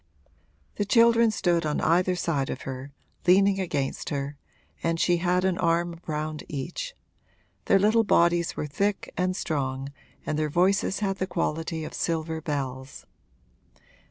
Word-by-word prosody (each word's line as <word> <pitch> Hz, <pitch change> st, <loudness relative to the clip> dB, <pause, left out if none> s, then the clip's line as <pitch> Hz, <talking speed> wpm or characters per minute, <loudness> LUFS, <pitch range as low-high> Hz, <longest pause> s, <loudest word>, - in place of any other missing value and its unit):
The -, -, +1 dB
children 230 Hz, +1 st, +5 dB
stood 175 Hz, -5 st, +1 dB
on 150 Hz, -1 st, -1 dB
either 180 Hz, +3 st, +2 dB
side 150 Hz, -6 st, -1 dB
of 130 Hz, -, -4 dB
her, 130 Hz, +1 st, -6 dB, 0.4 s
leaning 195 Hz, +2 st, +5 dB
against 145 Hz, -7 st, -2 dB
her, 140 Hz, 0 st, -3 dB, 0.5 s
and 165 Hz, 0 st, 0 dB
she 175 Hz, 0 st, +3 dB
had 180 Hz, +1 st, +1 dB
an 190 Hz, -1 st, +1 dB
arm 170 Hz, 0 st, +1 dB
round 155 Hz, 0 st, -3 dB
each; -, -, -5 dB, 0.7 s
their 195 Hz, -, +5 dB
little 215 Hz, +3 st, +4 dB
bodies 170 Hz, -4 st, +2 dB
were -, -, -2 dB
thick 200 Hz, +8 st, -2 dB
and 185 Hz, 0 st, 0 dB
strong 135 Hz, -6 st, -2 dB, 0.4 s
and 155 Hz, -, -1 dB
their 155 Hz, -1 st, 0 dB
voices 190 Hz, +5 st, +2 dB
had 195 Hz, -1 st, 0 dB
the 185 Hz, -, -2 dB
quality 165 Hz, -2 st, -2 dB
of -, -, -7 dB
silver 160 Hz, -1 st, -2 dB
bells. 135 Hz, -3 st, -4 dB
170 Hz, 145 wpm, -26 LUFS, 150-190 Hz, 0.7 s, children